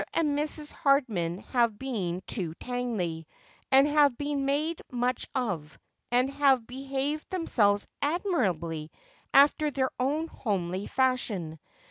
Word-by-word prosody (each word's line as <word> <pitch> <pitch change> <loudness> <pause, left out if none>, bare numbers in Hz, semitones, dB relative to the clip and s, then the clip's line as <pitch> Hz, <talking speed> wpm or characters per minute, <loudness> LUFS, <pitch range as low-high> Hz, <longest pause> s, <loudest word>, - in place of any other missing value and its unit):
and 300 -3 +2
Mrs. 300 0 -1
Hardman 225 - +1 0.2
have 235 -4 +2
been 195 -9 -3
to 170 -6 -3
Tangley, 210 -11 -3 0.4
and 270 +2 +7
have 290 -4 +4
been 285 -1 -2
made 305 +4 0
much 245 0 -1
of, 180 - -2 0.3
and 250 +2 +3
have 275 -4 +3
behaved 275 +4 -3
themselves 210 - +2 0.2
admirably 190 - -1 0.4
after 295 +2 +5
their 265 -2 -1
own 295 +6 0
homely 190 - -3
fadiion. 215 -11 0
255 Hz, 115 wpm, -28 LUFS, 195-285 Hz, 0.4 s, and